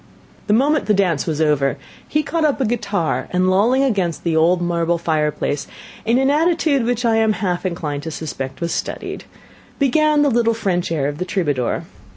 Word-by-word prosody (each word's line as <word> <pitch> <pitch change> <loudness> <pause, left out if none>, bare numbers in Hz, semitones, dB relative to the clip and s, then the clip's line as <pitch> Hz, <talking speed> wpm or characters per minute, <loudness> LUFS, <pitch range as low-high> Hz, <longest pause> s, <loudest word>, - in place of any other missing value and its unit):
The 210 - +3
moment 285 +6 +2
the 210 - +3
dance 180 -7 +1
was 155 -2 -1
over, 145 -3 +2 0.3
he 305 0 0
caught 325 +2 -1
up 295 -3 +1
a 265 - +1
guitar, 210 -7 -1
and 185 +1 +1
lolling 235 +8 +3
against 195 - 0
the 170 -2 0
old 170 +3 +3
marble 170 -1 0
fireplace, 150 -3 -1 0.4
in 230 +2 +3
an 270 +1 +3
attitude 310 -4 +2
which 245 0 -1
I 225 -1 +3
am 220 -1 +3
half 185 -3 -2
inclined 150 -5 -4
to 160 - -5
suspect 145 -4 -6
was 170 0 -1
studied, - - -5 0.5
began 300 +2 +3
the 285 - +2
little 230 -1 +2
French 180 -6 -1
air 145 -4 0
of 145 +1 -5
the 180 - -2
Troubadour. 150 -9 -1
185 Hz, 190 wpm, -20 LUFS, 165-245 Hz, 0.5 s, The